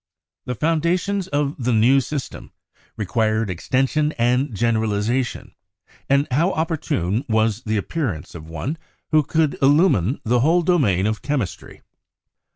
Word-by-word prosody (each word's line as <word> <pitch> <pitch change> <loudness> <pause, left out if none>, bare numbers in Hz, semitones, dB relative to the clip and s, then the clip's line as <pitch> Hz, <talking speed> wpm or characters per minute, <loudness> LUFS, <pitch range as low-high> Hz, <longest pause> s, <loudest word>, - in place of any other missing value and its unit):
The 125 - -3
foundations 170 - 0
of 145 -4 -2
the 125 - +1
new 125 +5 +4
system 135 +1 -6 0.5
required 110 0 0
extension 135 - 0
and 125 +4 +1
generalization, 110 +2 -1 0.6
and 140 +1 +3
how 165 +9 +2
opportune 140 - -1
was 110 0 +1
the 110 0 0
appearance 105 - -3
of 80 -1 -10
one 135 - -4 0.3
who 155 -1 +5
could 155 +1 0
illumine 140 - +3
the 120 +1 +2
whole 165 +7 +3
domain 130 - +2
of 110 0 -1
chemistry. 135 -11 -4
125 Hz, 125 wpm, -21 LUFS, 110-150 Hz, 0.6 s, who